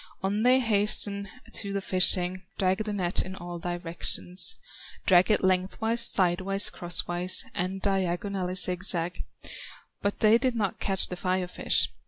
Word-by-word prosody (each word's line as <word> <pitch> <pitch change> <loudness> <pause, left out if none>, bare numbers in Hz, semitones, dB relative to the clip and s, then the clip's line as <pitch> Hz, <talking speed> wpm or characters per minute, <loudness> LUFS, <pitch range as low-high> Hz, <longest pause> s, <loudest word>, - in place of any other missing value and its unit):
On 200 +2 -1
they 250 +2 +4
hasten 205 -3 +1 0.2
to 200 -2 -3
the 200 - -2
fishing, 185 -1 +2 0.2
Drag 190 +3 -1
the 210 - -4
net 185 -3 -1
in 185 0 -8
all 175 -2 -8
directions, 175 +1 -1 0.5
Drag 185 +1 +4
it 210 - +1
lengthwise, 190 +5 -1
sidewise, 195 -2 +3
crosswise, 175 +1 +2
And 185 +2 -4
diagonally 190 -1 -2
zigzag; 180 -1 +1 0.8
But 200 0 -3
they 220 +2 +5
did 255 -2 0
not 205 -5 -3
catch 195 -1 0
the 180 - -5
Fire 185 0 -2
fish. - - +2
190 Hz, 140 wpm, -26 LUFS, 180-200 Hz, 0.8 s, they